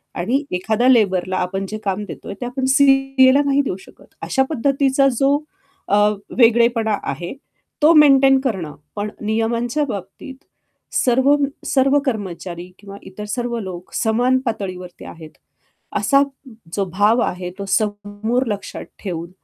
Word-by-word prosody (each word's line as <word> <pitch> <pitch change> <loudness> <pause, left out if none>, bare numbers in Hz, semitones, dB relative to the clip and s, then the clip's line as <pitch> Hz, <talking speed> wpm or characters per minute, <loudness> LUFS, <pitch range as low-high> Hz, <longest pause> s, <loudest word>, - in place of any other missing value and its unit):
आणि 250 +12 0
एखाद्या 220 +7 +1
लेबरला 190 -6 +2
आपण 195 +2 -2
जे 215 - -4
काम 200 +1 -2
देतोय, - - -8
ते - - -2
आपण 260 +2 -3
सीएला 270 0 +5
नाही 280 0 +3
देऊ 260 - -3
शकत. - - -17 0.2
अशा 265 - +1
पद्धतीचा 275 0 +2
जो, 275 +1 +3 0.5
अ, 205 - +3 0.4
वेगळेपणा 235 -2 +3
आहे 175 +5 -4 0.5
तो, 310 +3 +6
मेंटेन 270 -3 +6
करणं, 190 - -3 0.2
पण 205 +1 -3
नियमांच्या 230 +6 -1
बाबतीत, 210 +4 -7 0.6
सर्व 265 +3 +3 0.3
सर्व 275 +1 +3
कर्मचारी 180 -6 -4
किंवा 200 -1 -11
इतर 200 +2 -8
सर्व 240 -1 -2
लोक 185 -3 -8
समान 245 +3 +2
पातळीवरती 185 -5 -5
आहेत, 160 -2 -11 0.7
असा 275 0 +3 0.5
जो 200 -1 0
भाव 210 +5 +3
आहे 180 0 -4
तो 200 - -4
समोर 210 +4 -1
लक्षात 205 -2 -5 0.2
ठेवून, 170 -3 -4
225 Hz, 135 wpm, -20 LUFS, 195-265 Hz, 0.7 s, तो